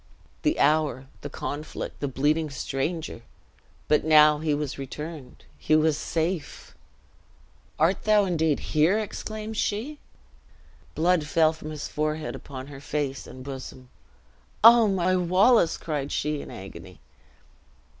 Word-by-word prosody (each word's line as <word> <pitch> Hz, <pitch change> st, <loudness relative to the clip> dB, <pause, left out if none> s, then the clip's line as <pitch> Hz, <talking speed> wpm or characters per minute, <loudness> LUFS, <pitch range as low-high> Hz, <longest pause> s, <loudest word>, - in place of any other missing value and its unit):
The 305 Hz, +1 st, +1 dB
hour 145 Hz, -3 st, +2 dB, 0.2 s
the 145 Hz, -, -6 dB
conflict 145 Hz, +2 st, -6 dB
the 145 Hz, -, -2 dB
bleeding 150 Hz, +4 st, 0 dB
stranger! 140 Hz, +2 st, -3 dB, 0.7 s
But 150 Hz, -, +3 dB
now 150 Hz, -1 st, +6 dB
he 155 Hz, -1 st, 0 dB
was 145 Hz, -2 st, -4 dB
returned 150 Hz, +1 st, -8 dB
he 155 Hz, -, +2 dB
was 155 Hz, 0 st, +3 dB
safe! 165 Hz, +1 st, -3 dB, 1.0 s
"Art 165 Hz, +5 st, +2 dB
thou 210 Hz, -1 st, +4 dB
indeed 160 Hz, -5 st, +1 dB
here!" 160 Hz, +6 st, +4 dB
exclaimed 215 Hz, 0 st, -5 dB
she. 245 Hz, +11 st, -2 dB, 1.0 s
Blood 165 Hz, -1 st, +2 dB
fell 160 Hz, 0 st, +3 dB
from 155 Hz, -1 st, -9 dB
his 150 Hz, -1 st, -5 dB
forehead 155 Hz, 0 st, -2 dB
upon 130 Hz, -2 st, -8 dB
her 140 Hz, -1 st, -11 dB
face 140 Hz, -2 st, -3 dB
and 130 Hz, -, -10 dB
bosom: 130 Hz, -1 st, -9 dB, 0.7 s
"O, 230 Hz, 0 st, +8 dB
my 185 Hz, -2 st, +1 dB
Wallace!" 185 Hz, +2 st, +4 dB
cried 145 Hz, -3 st, -4 dB
she, 150 Hz, -1 st, -1 dB
in -, -, -10 dB
agony. 95 Hz, -2 st, -10 dB
155 Hz, 125 wpm, -26 LUFS, 145-175 Hz, 1.0 s, O